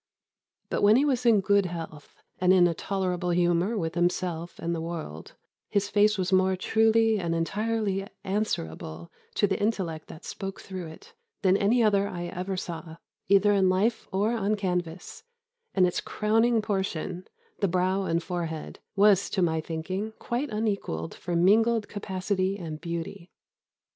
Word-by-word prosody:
But - - 0
when 205 +2 +6
he 275 +4 +4
was 250 -4 +1
in 215 -4 +5
good 200 -1 +3
health, 165 -4 -8 0.2
and 180 0 +4
in 185 -2 +6
a 175 - +2
tolerable 180 0 -2
humour 175 +5 +2
with 165 -4 -2
himself 175 -1 -1
and 170 +1 -2
the 165 - -3
world, 160 - -6 0.4
his 200 0 0
face 210 +1 +3
was 185 0 -1
more 190 0 +4
truly 225 +2 +3
and 170 -2 -1
entirely 200 +2 -1 0.2
answerable 85 - -3 0.2
to - - +3
the 195 0 -1
intellect 185 -7 -1
that 155 - -11
spoke 195 0 -6
through 185 -3 -7
it, 420 - -13 0.3
than 190 -1 +5
any 225 +5 +3
other 200 -2 +3
I 175 -3 -5
ever 185 +2 -4
saw, 165 -2 -6 0.3
either 200 +2 +5
in 190 -2 +4
life 210 +5 +1
or 205 +3 +1
on 215 -2 0
canvas; 180 - -3 0.5
and 185 - +5
its 180 - -1
crowning 225 +1 +2
portion 190 -3 -3 0.3
the 200 - +2
brow 185 +2 +1
and 165 0 0
forehead 165 -3 -4 0.2
was, 200 -1 +4
to 190 - 0
my 160 -2 +1
thinking, 185 +7 -4
quite 250 +4 -2
unequalled 200 - -2
for 175 0 -4
mingled 220 +5 +4
capacity 190 -1 -2
and 160 -5 -6
beauty. 170 +1 -5
190 Hz, 160 wpm, -27 LUFS, 170-210 Hz, 0.5 s, when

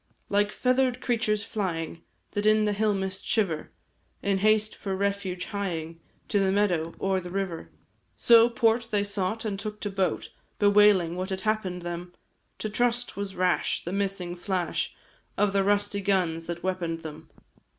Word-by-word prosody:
Like 205 0 +2
feather'd 255 0 +1
creatures 220 -4 0
flying, 170 -6 -3 0.3
That 205 +1 0
in 215 0 +5
the 210 -1 +1
hill 210 0 +1
mist 190 0 -3
shiver, 180 -9 0 0.5
In 200 -1 +1
haste 215 +1 +3
for 195 -2 -3
refuge 200 -2 -2
hieing, 165 -5 -3 0.3
To 205 - +2
the 195 -1 +2
meadow 180 -5 +1
or 190 -1 +1
the 180 -1 -8
river 185 -3 -3 0.5
So, 235 0 +6
port 230 0 +2
they 205 -2 +1
sought, 200 +2 -2
and 200 -2 -2
took 210 +1 -5
to 205 - -3
boat, 190 -1 -1 0.3
Bewailing 205 -4 +5
what 185 +1 -3
had 190 -1 -2
happened 190 -4 -1
them, 175 +1 -5 0.4
To - - -3
trust 240 +3 0
was 200 -1 -4
rash, 180 -1 +1
the 175 - -3
missing 195 -3 -2
flash 180 -1 -2 0.4
Of 205 -1 +2
the 195 -1 +3
rusty 205 0 +1
guns 180 -4 0
that 170 0 -5
weapon'd 170 -3 -2
them. 155 0 -9
195 Hz, 160 wpm, -27 LUFS, 180-210 Hz, 0.5 s, So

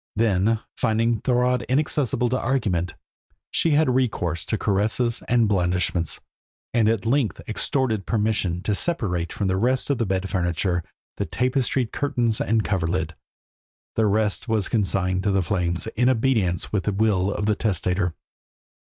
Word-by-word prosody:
Then, 110 0 +2 0.2
finding 115 -1 +1
Thorodd 125 -1 +2
inaccessible 135 -2 +1
to 130 +2 0
argument, 95 -11 -1 0.6
she 165 - +2
had 150 -4 +3
recourse 100 -10 0
to 110 - -1
caresses 110 +4 +1
and 120 -2 +3
blandishments, 90 -3 0 0.5
and 115 -2 +3
at 115 -1 0
length 125 -1 +1
extorted 110 -2 -1
permission 105 -5 0
to 105 - +1
separate 95 - 0
from 100 - -3
the 95 0 +1
rest 125 +6 +1
of 140 - -1
the 115 - 0
bed 95 0 -1
furniture 90 -1 0 0.3
the - - -1
tapestried 125 -1 0
curtains 120 -6 0
and 110 0 +1
coverlid; 85 -3 -1 0.8
the 110 -1 +3
rest 105 +2 0
was 110 -4 0
consigned 95 -4 0
to 100 - 0
the 95 -1 +2
flames, 90 -1 -1
in 125 +3 +3
obedience 110 -9 +1
to 105 - +3
the 95 +3 -1
will 100 -2 +1
of 105 - -2
the 105 - +3
testator. 90 -4 -1
105 Hz, 150 wpm, -24 LUFS, 95-120 Hz, 0.8 s, had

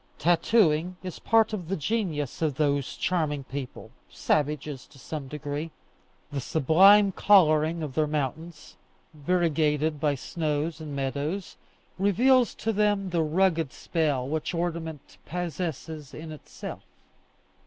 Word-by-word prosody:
Tattooing 175 0 +2
is 185 -3 -6
part 225 -1 +3
of 180 -6 -4
the 195 - -2
genius 155 - -2
of 155 -4 0
those 140 -2 0
charming 155 -6 -1
people, 135 0 -7 0.2
savages 150 -2 -1
to - - -19
some 140 +1 -6
degree. 145 +2 -5 0.6
The 140 -1 -3
sublime 190 +9 +5
colouring 165 -5 +4
of 145 -4 -5
their 155 +1 +1
mountains, 150 +2 -4 0.4
variegated 155 -2 +1
by 145 -1 +1
snows 155 +2 -3
and 150 -2 -6
meadows, 140 +7 -3 0.4
reveals 240 +6 +3
to 225 - -2
them 205 -2 +1
the 170 -1 +1
rugged 165 -2 +1
spell 145 -6 -1
which 155 +4 -2
ornament 165 -3 -4
possesses 160 -3 -5
in 155 +1 -8
itself. 155 - -9
160 Hz, 120 wpm, -27 LUFS, 145-180 Hz, 0.6 s, sublime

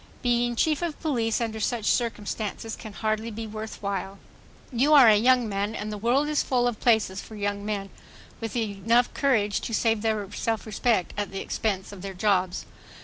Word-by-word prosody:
Being 240 -1 +2
Chief 305 +5 +1
of 335 -3 -3
Police 235 -8 0
under 225 -2 -2
such 220 0 -1
circumstances 225 -1 -1
can 220 - -9
hardly 215 +4 -1
be 225 0 -5
worth 220 0 -7
while. 195 0 -3 0.6
You 280 +6 +4
are 270 -5 +9
a 215 - +8
young 245 +2 +4
man 205 +2 -2
and 215 -1 -4
the 210 - -4
world 250 +7 +2
is 300 -1 +1
full 245 -2 +1
of 240 -3 -2
places 220 -5 +2
for 220 - -11
young 205 -1 -2
men 205 -2 -3 0.5
with 225 -2 -5 0.6
courage 220 -8 +2
enough - - -15
to 230 - -5
save 225 -1 +2
their 215 -2 0
self 225 +1 -2
respect 215 -2 0
at 205 -1 -2
the 195 - -4
expense 195 -3 -2
of 200 -3 -10
their 195 0 -6
jobs. 185 -2 +1
220 Hz, 190 wpm, -26 LUFS, 205-240 Hz, 0.6 s, are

